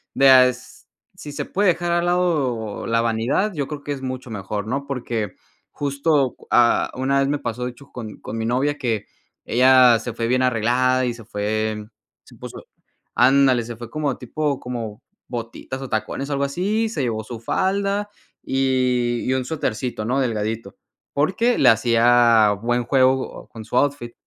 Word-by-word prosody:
de, 135 0 +6
ah, 130 -1 +8
es 125 0 -8 0.3
si 150 - -9
se 145 - -4
puede 200 +1 0
dejar 175 0 0
al 175 0 +1
lado 145 - 0
la 115 0 +2
vanidad, 115 - 0
yo 145 -5 -3
creo 150 -2 -7
que 145 - -5
es 140 -2 -4
mucho 130 -2 -6
mejor, 100 0 -4
¿no? 135 +5 -3
Porque 120 -7 -3 0.3
justo, 140 -1 0
ah, 120 -1 +4
una 135 +2 +1
vez 135 - +2
me 145 +1 0
pasó, 125 -3 -4
de 125 - -3
hecho 140 +3 -18
con 115 -4 -8
con - - -7
mi 110 0 -2
novia 140 +5 0
que 110 -5 -1 0.4
ella 125 -1 +5
se 120 +1 -6
fue 115 0 -3
bien 125 +2 +1
arreglada 125 +1 +2
y 120 - -1
se 115 -1 -12
fue 105 +1 -2 0.4
se - - -17
puso - - -10 0.5
Ándale, 130 -1 +4
se 120 +1 -7
fue 120 0 -10
como 150 -4 -2
tipo 145 +2 -2
como 115 -4 -6 0.2
botitas 120 +2 -6
o 130 - -7
tacones 130 +5 -3
o - - 0
algo 140 0 0
así, 205 +10 -1
se 185 -10 -3
llevó 110 -3 -2
su 115 +1 -8
falda 200 - -1 0.3
y 125 -2 +1
y - - +2
un 130 -1 -1
suetercito, 125 -6 -3
¿no?, 130 +4 0
delgadito, 110 -4 -2 0.4
porque 190 +12 +1
le 130 - +6
hacía 115 -1 +4
buen 120 +1 0
juego 130 0 +1
con 115 - -10
su 125 - -2
outfit. 140 -4 0
125 Hz, 180 wpm, -22 LUFS, 115-140 Hz, 0.5 s, ah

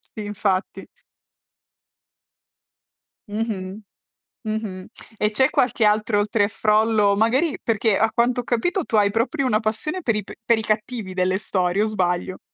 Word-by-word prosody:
Sì 215 - -10
infatti. 200 -2 -2 2.4
Mh-mh. 205 -2 -4 0.6
Mh-mh. 215 -4 -4 0.3
E 210 - +1
c'è 260 +5 +3
qualche 240 -3 +1
altro 210 0 +2
oltre 205 +1 +1
a 200 - 0
Frollo 215 -1 +2
magari 255 +9 +2
perché 220 -2 +1
a 225 +1 +2
quanto 245 +1 +1
ho - - -8
capito 315 - 0
tu 220 - -1
hai 205 -1 +4
proprio 260 +6 -1
una 215 -3 +2
passione 225 +12 -2
per 230 -7 0
i 210 - -3
p - - -10
per 230 0 +3
i 220 - -3
cattivi 215 -2 -3
delle 185 0 +1
storie 185 0 0
o - - +3
sbaglio? 185 -3 -1
215 Hz, 155 wpm, -22 LUFS, 200-230 Hz, 2.4 s, hai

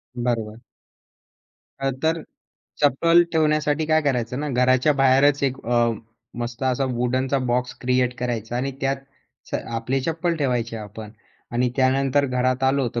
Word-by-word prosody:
बरोबर. 115 -3 -2 1.2
अ, 135 0 0
तर 160 0 +1 0.6
चप्पल 165 +5 +5
ठेवण्यासाठी 155 -1 +2
काय 155 0 +3
करायचं 125 -3 -1
ना, 150 - -2
घराच्या 130 +2 +3
बाहेरच 135 +2 +4
एक 135 -1 +1
अ, 120 -1 +3 0.5
मस्त 120 +1 -5
असा 130 +1 +1
वुडनचा 130 +3 0
बॉक्स 125 +1 0
क्रिएट 125 0 +1
करायचा 120 -1 -3
आणि 135 +2 -1
त्यात 135 0 0 0.5
स - - -5 0.2
आपले 130 +4 -1
चप्पल 165 +4 -1
ठेवायचे 125 -6 -1
आपण. 105 0 -8 0.4
आणि 125 +1 +1
त्यानंतर 135 +2 +2
घरात 130 0 0
आलो, 135 -1 +2
तर 120 - -1
130 Hz, 140 wpm, -23 LUFS, 120-140 Hz, 1.2 s, चप्पल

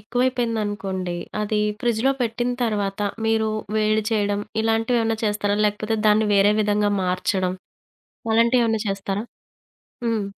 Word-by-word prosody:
ఎక్కువైపోయిందనుకోండి. 210 -6 -1 0.2
అది 210 0 0 0.2
ఫ్రిడ్జ్‌లో 240 +2 +2
పెట్టిన 240 +1 -1
తర్వాత, 205 -3 -2 0.3
మీరు 220 -1 +2 0.3
వేడి 215 0 +2
చేయడం 205 -1 0 0.2
ఇలాంటివేమన్నా 225 0 +1
చేస్తారా? 205 -1 0
లేకపోతే 215 +2 -1
దాన్ని 215 +1 +4
వేరే 200 +1 +5
విధంగా 205 0 +2
మార్చడం 185 0 0 0.8
అలాంటివేమన్నా 230 -1 +3
చేస్తారా? 195 +2 -2 0.8
హ్మ్. 220 -3 0
215 Hz, 105 wpm, -23 LUFS, 205-225 Hz, 0.8 s, వేరే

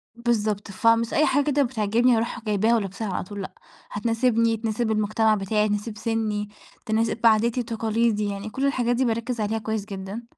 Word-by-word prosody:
بالضبط، 215 -4 -1
فمش 230 +4 +2
أي 305 - +4
حاجة 285 +2 +2
كده 290 -1 +2
بتعجبني 235 0 +2
أرُوح 235 +2 -2
جايباها 215 +2 +2
ولابساها 205 0 -3
على - - -2
طول، 205 +2 -7
لأ، 190 - -7 0.4
هتناسبني، 230 +1 +1
تناسِب 220 +1 -1
المجتمَع 215 +1 +2
بتاعي، 210 +2 0
تناسِب 210 +1 -3
سِنّي، 215 -2 -2 0.4
تناسِب 225 +1 0
عاداتي 225 +2 +3
وتقاليدي، 225 -2 0
يعني 200 +2 -5
كل 265 +5 -2
الحاجات 245 -3 +1
دي 260 - +1
باركّز 230 0 -2
عليها 215 +1 -1
كويس 220 -1 -3
جدًا. 195 +2 -6
225 Hz, 170 wpm, -24 LUFS, 210-235 Hz, 0.4 s, أي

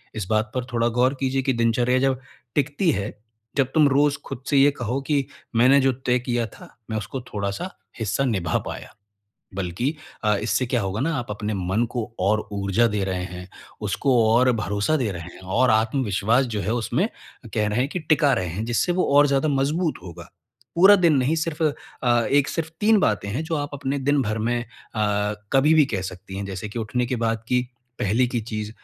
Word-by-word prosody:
इस 105 -3 -3
बात 110 0 +1
पर 125 -1 -1
थोड़ा 115 0 +2
गौर 130 +2 +4
कीजिए 135 0 0
कि 130 0 0
दिनचर्या 120 +2 +2
जब 135 -1 +1 0.4
टिकती 145 +5 +1
है, 100 -6 -2 0.5
जब 135 -1 +2
तुम 150 -2 +5
रोज़ 140 +1 +3
खुद 125 - -7
से 140 - +3
ये 140 +1 +6
कहो 125 0 -3
कि 145 -3 +1 0.3
मैंने 130 +4 +6
जो 135 0 +3
तय 125 0 0
किया 120 -1 -1
था, - - -14 0.2
मैं 110 - -2
उसको 115 +5 -5
थोड़ा-सा 100 - -3 0.3
हिस्सा 110 +5 0
निभा 95 -10 0
पाया। - - -7 0.6
बल्कि 95 - -2 0.3
अ, 105 -1 +3
इससे 125 +3 0
क्या 125 0 0
होगा 95 +3 -2
ना 165 +4 0
आप 120 -4 -4
अपने 105 +1 -3
मन 95 +5 0
को 120 -1 -3
और 105 +3 +1
ऊर्जा 100 +3 +2
दे 100 -2 0
रहे 90 -1 -2
हैं, 90 0 -8 0.3
उसको 135 -3 +1 0.2
और 125 +2 +4
भरोसा 105 +10 0
दे 120 -7 -1
रहे 85 -2 -6
हैं - - -13 0.2
और 130 0 +4
आत्मविश्वास 110 +1 +2
जो 105 - -1
है 110 - -1
उसमें 115 -2 0 0.5
कह 105 -1 +1
रहे 105 +2 -1
हैं 135 - +1
कि 180 - -3
टिका 150 -2 +3
रहे 90 - -1
हैं, 95 +7 -4
जिससे 120 +9 +1
वो 180 +1 +1
और 145 0 +7
ज़्यादा 140 +2 +1
मजबूत 150 +4 +1
होगा। 85 -1 -10 0.4
पूरा 190 +4 +8
दिन 170 -5 +4
नहीं 135 +4 +2
सिर्फ़ 160 0 -2 0.4
अ, 120 -2 +3
एक 140 0 +3
सिर्फ़ 160 -1 -3
3 215 0 +5
बातें 105 - +1
हैं 125 +9 -2
जो 160 0 -2
आप 145 0 -3
अपने 140 0 -2
दिन 140 +1 +2
भर 110 -1 -2
में 120 +2 0
अ, 105 -3 -2 0.2
कभी 145 +4 +5
भी 155 -2 +6
कह 95 - -1
सकती 95 +1 -7
हैं। 100 - -3
जैसे 95 +2 -5
कि 105 - -6
उठने 115 +3 -1
के 125 - -2
बाद 115 -1 -1
की 125 0 +2 0.4
पहले 110 +6 +2
की 120 -1 -2
चीज़, 110 -1 -5
120 Hz, 210 wpm, -23 LUFS, 105-140 Hz, 0.6 s, पूरा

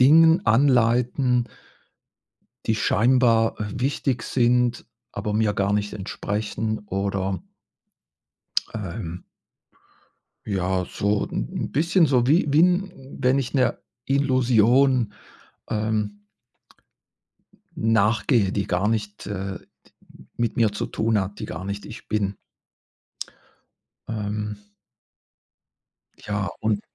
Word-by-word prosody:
Dingen 160 +6 +6
anleiten 125 0 +3 1.2
die 110 - +1
scheinbar, 115 0 +3
äh, - - -1
wichtig 130 0 -1
sind, 125 -1 +1 0.3
aber 105 +1 -3
mir 105 -1 +2
gar 100 0 0
nicht 105 0 -1
entsprechen 105 +2 -3
oder 95 -1 -2 1.3
ähm 90 -4 -6 1.2
ja, 95 -2 -1
so 100 +3 0
'n - - -4
'n - - -3
bisschen 165 +4 +3
so 125 -4 +2
wie 155 +5 +4
wie 145 +3 +5
'n 180 +2 +2 0.3
wenn 130 +2 +3
ich 130 - -4
'ner 130 -2 +2 0.3
Illusion, 130 -3 +3 0.6
ähm 105 -1 -2 1.5
nachgehe, 110 -1 +2
die 100 -3 -2
gar 95 +4 +1
nicht, 105 -2 -2
äh, 95 -2 -4
d - - -28 0.5
mit 120 -1 -1
mir 110 -3 +3
zu 105 - -3
tun 110 -1 0
hat, 100 +1 -5
die - - -4
gar 95 +3 -6
nicht 100 +1 -5
ich 110 - -10
bin. 100 -2 -1 1.7
Ähm 105 -1 -3 1.6
Ja 105 -1 -3
und 105 -1 0
110 Hz, 105 wpm, -24 LUFS, 100-125 Hz, 1.7 s, Dingen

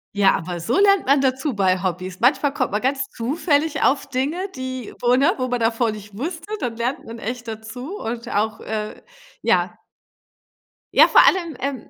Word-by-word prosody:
Ja, 200 -1 +4
aber 175 +1 -5
so 230 - 0
lernt 400 -1 +4
man 275 +1 +4
dazu 265 +1 0
bei 185 -2 +1
Hobbys. 185 0 -3
Manchmal 275 +3 +3
kommt - - -1
man 210 - -1
ganz 270 +1 0
zufällig 290 +4 0
auf 280 0 +2
Dinge, 275 +6 -2 0.2
die, 260 -3 -6
wo 245 0 +4
ne? 285 +8 +3
Wo 255 -1 -1
man 245 - -1
davor 225 0 +1
nicht 210 -1 -10
wusste, 330 +4 -5
dann 245 -4 -3
lernt 245 +3 -2
man 230 +1 -8
echt 240 +2 -5
dazu 225 - -7
und 235 +1 -5
auch, 220 -1 -1
äh, 215 -1 -5 0.4
ja. - - +1 1.2
Ja, - - +8
vor - - +7
allem, 340 -5 +2
ähm, 270 -3 -4
250 Hz, 180 wpm, -22 LUFS, 220-280 Hz, 1.2 s, Ja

